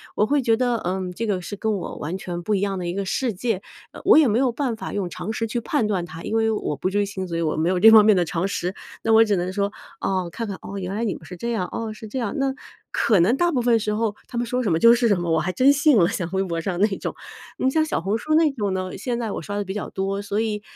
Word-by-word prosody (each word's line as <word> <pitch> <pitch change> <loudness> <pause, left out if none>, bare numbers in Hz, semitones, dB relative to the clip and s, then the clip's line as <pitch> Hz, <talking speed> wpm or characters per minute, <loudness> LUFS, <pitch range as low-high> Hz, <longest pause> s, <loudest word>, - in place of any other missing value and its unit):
我 210 - +3
会 285 +4 +2
觉 225 -2 +2
得， 245 -1 +1
嗯， 185 0 -2
这 230 +6 -4
个 190 -3 0
是 205 +4 -6
跟 220 +2 -1
我 180 - -6
完 165 +6 -4
全 175 -2 -5
不 215 - 0
一 - - +1
样 195 -1 -1
的 175 - -4
一 175 - -2
个 200 - -2
世 245 +3 -1
界， 200 0 -2 0.3
呃， - - -11
我 - - +7
也 310 - +6
没 220 0 +2
有 260 -2 +2
办 245 -1 -2
法 220 - -6
用 195 -3 -2
常 215 - -5
识 225 - -2
去 240 +2 -2
判 275 -2 0
断 185 -4 -1
它。 165 -1 -10
因 220 - -3
为 225 0 +2
我 210 -8 -2
不 145 +7 -2
追 205 +1 +1
星， 190 -2 -5
所 170 -1 -3
以 - - -1
我 155 -2 0
没 160 +2 +1
有 185 -1 +1
这 225 - +9
方 220 -1 +9
面 215 - +6
的 180 -2 +2
常 175 +3 -1
识。 185 -1 -3 0.3
那 225 - +1
我 225 +1 +8
只 210 -2 +1
能 180 +1 -2
说， 200 0 0 0.3
哦， 185 -3 -1
看 230 -2 -4
看， 195 - -5
哦， 200 - -7
原 190 0 -4
来 220 - -2
你 215 - -1
们 - - -12
是 180 - -9
这 235 +6 -3
样， 185 -6 -1
哦， 225 -1 -4
是 220 +1 -10
这 235 +5 -4
样。 230 -5 -2
那 275 -1 0 0.4
可 215 -5 +3
能 190 +10 +4
大 345 0 +2
部 255 -6 +1
分 235 -1 +3
时 210 0 -1
候 215 -1 -1
他 240 - -6
们 240 - 0
说 250 +1 -1
什 205 - 0
么 160 - +3
就 230 0 +7
是 240 0 +2
什 200 -5 +2
么， 175 -1 -2
我 160 - +3
还 180 +3 -1
真 265 +8 +5
信 285 -3 +4
了， 170 - +5
像 175 -4 -3
微 190 0 +1
博 170 -3 -3
上 180 0 -3
那 210 - +5
种。 - - -4 0.5
呃， - - -1
你 260 - +3
像 315 +2 +2
小 - - -1
红 195 +5 -1
书 310 +6 0
那 320 -2 +4
种 210 -7 -2
呢， 185 0 -4
现 240 +1 -2
在 225 -3 -3
我 - - -4
刷 205 - -5
得 205 - -1
比 190 - -4
较 210 - -4
多， 195 +1 -2
所 205 +1 -2
以， 215 -2 -1
205 Hz, 340 characters per minute, -23 LUFS, 185-230 Hz, 0.5 s, 这